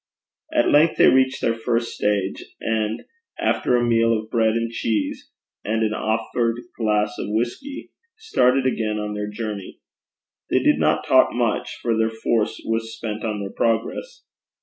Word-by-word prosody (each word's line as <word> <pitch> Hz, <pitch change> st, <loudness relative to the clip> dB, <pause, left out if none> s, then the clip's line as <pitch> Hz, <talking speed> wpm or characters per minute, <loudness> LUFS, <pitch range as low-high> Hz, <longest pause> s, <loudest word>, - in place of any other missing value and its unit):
At 305 Hz, -1 st, +2 dB
length 155 Hz, +2 st, +4 dB
they -, -, +7 dB
reached 130 Hz, 0 st, +3 dB
their 115 Hz, -, +2 dB
first 115 Hz, +1 st, -1 dB
stage, 100 Hz, -2 st, -1 dB, 0.2 s
and 110 Hz, 0 st, -1 dB, 0.3 s
after 125 Hz, -, +1 dB
a 120 Hz, 0 st, +2 dB
meal 115 Hz, -1 st, +3 dB
of 110 Hz, 0 st, -8 dB
bread 110 Hz, -1 st, +2 dB
and 115 Hz, 0 st, -1 dB
cheese 110 Hz, -3 st, -2 dB, 0.3 s
and 110 Hz, +2 st, 0 dB
an 110 Hz, -1 st, 0 dB
offered 115 Hz, +2 st, -1 dB, 0.2 s
glass 105 Hz, -2 st, 0 dB
of -, -, -3 dB
whisky, 120 Hz, -, -3 dB, 0.3 s
started 135 Hz, -, +2 dB
again 110 Hz, -4 st, 0 dB
on 105 Hz, 0 st, -3 dB
their 105 Hz, 0 st, -3 dB
journey. 105 Hz, -2 st, -6 dB, 0.7 s
They -, -, +3 dB
did -, -, +3 dB
not -, -, +2 dB
talk -, -, +5 dB
much, -, -, -1 dB
for 115 Hz, -, +1 dB
their 110 Hz, 0 st, +2 dB
force 110 Hz, -1 st, -1 dB
was 115 Hz, 0 st, -2 dB
spent 110 Hz, -1 st, -5 dB
on 105 Hz, -2 st, -2 dB
their 100 Hz, -1 st, -5 dB
progress. 120 Hz, -, -1 dB
115 Hz, 160 wpm, -22 LUFS, 110-120 Hz, 0.7 s, they